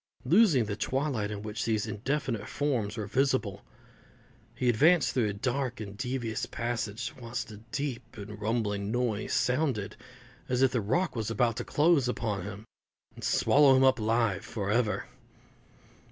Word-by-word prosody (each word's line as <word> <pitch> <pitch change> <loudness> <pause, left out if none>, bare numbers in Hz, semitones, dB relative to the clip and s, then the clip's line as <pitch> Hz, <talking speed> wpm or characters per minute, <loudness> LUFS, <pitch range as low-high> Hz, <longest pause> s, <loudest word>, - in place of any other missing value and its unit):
Losing 160 - +5
the 105 -1 -3
twilight 130 -2 -1
in 105 -1 -5
which 105 +1 -4
these 110 -2 0
indefinite 115 0 -2
forms 125 -7 -1
were 110 - -3
visible, 125 -3 0 0.9
he 125 +1 -1
advanced 150 +8 +4
through 115 -5 +1
a - - -3
dark 125 +4 -2
and 100 -2 -7
devious 125 -1 -3
passage, 115 -3 -3
whilst 115 -1 -5
a 105 - -9
deep 140 -6 -4
and 105 +1 -8
rumbling 105 -2 -1
noise 120 -3 -1
sounded 125 -6 0 0.5
as 125 +1 +2
if 130 - +4
the 125 - 0
rock 170 - 0
was 110 -2 -2
about 115 +1 +1
to - - -2
close 150 -4 +3
upon 105 -5 -2
him, 100 +1 -8 0.5
and - - -12
swallow 140 -2 +5
him 130 - +4
up 130 -2 +4
alive 110 -3 +1
for 100 -3 -3
ever. 110 -1 +1
115 Hz, 155 wpm, -29 LUFS, 105-130 Hz, 0.9 s, Losing